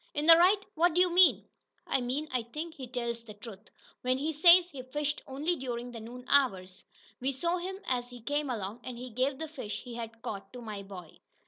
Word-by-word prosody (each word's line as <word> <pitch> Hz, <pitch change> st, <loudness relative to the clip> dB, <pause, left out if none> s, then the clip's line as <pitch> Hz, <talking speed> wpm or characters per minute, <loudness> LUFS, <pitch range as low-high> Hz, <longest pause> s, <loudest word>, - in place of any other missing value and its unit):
"In 295 Hz, +1 st, -1 dB
th' 335 Hz, -, +12 dB
right? 365 Hz, +5 st, +6 dB, 0.2 s
What 335 Hz, +1 st, +2 dB
do -, -, +3 dB
you 360 Hz, -1 st, +4 dB
mean?" 365 Hz, 0 st, +5 dB, 0.4 s
"I 265 Hz, -, 0 dB
mean 265 Hz, +5 st, -2 dB
I 250 Hz, -1 st, +1 dB
think 305 Hz, +8 st, -7 dB
he 265 Hz, -5 st, -8 dB
tells 235 Hz, -2 st, -4 dB
the 215 Hz, -3 st, -11 dB
truth, 205 Hz, -1 st, -11 dB, 0.3 s
when 255 Hz, +1 st, +1 dB
he 305 Hz, +4 st, -2 dB
says 345 Hz, +3 st, +7 dB
he 270 Hz, -, -7 dB
fished 295 Hz, +3 st, -3 dB
only 295 Hz, +6 st, -1 dB
during 245 Hz, -3 st, -5 dB
the 235 Hz, -, -8 dB
noon 245 Hz, +3 st, -10 dB
hour. 255 Hz, -10 st, +3 dB, 0.6 s
We 265 Hz, +2 st, 0 dB
saw 335 Hz, +7 st, -1 dB
him 375 Hz, +2 st, -5 dB
as 245 Hz, -1 st, -1 dB
he 245 Hz, 0 st, -11 dB
came 290 Hz, +3 st, -1 dB
along, 215 Hz, -1 st, -4 dB
and 250 Hz, -2 st, -7 dB
he 250 Hz, +1 st, -8 dB
gave 260 Hz, +4 st, 0 dB
the 320 Hz, -, -5 dB
fish 260 Hz, -9 st, -6 dB
he 245 Hz, -, -9 dB
had 230 Hz, -1 st, -7 dB
caught 200 Hz, -2 st, -6 dB
to 250 Hz, -, -8 dB
my 210 Hz, -3 st, -6 dB
boy." 185 Hz, -5 st, -11 dB
255 Hz, 225 wpm, -30 LUFS, 235-305 Hz, 0.6 s, th